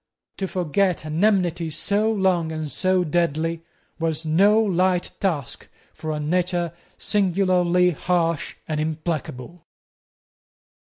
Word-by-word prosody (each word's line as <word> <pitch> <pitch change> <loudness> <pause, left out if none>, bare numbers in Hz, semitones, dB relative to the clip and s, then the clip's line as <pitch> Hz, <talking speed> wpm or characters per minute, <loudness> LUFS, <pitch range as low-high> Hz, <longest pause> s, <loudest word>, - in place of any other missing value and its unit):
To 190 - -2
forget 180 -1 0
an 155 +4 -1
enmity 175 -6 +2
so 205 +7 0
long 185 -6 +1
and 155 -2 -4
so 185 -1 +2
deadly 165 0 0 0.4
was 160 -1 -1
no 200 +7 +4
light 185 -3 +1
task 160 -10 -2 0.2
for 155 - -5
a 150 - -2
nature 175 +2 0 0.2
singularly 180 -2 +2
harsh 170 -1 -1
and 155 -1 -2
implacable. 155 -1 -4
175 Hz, 110 wpm, -23 LUFS, 160-185 Hz, 0.4 s, no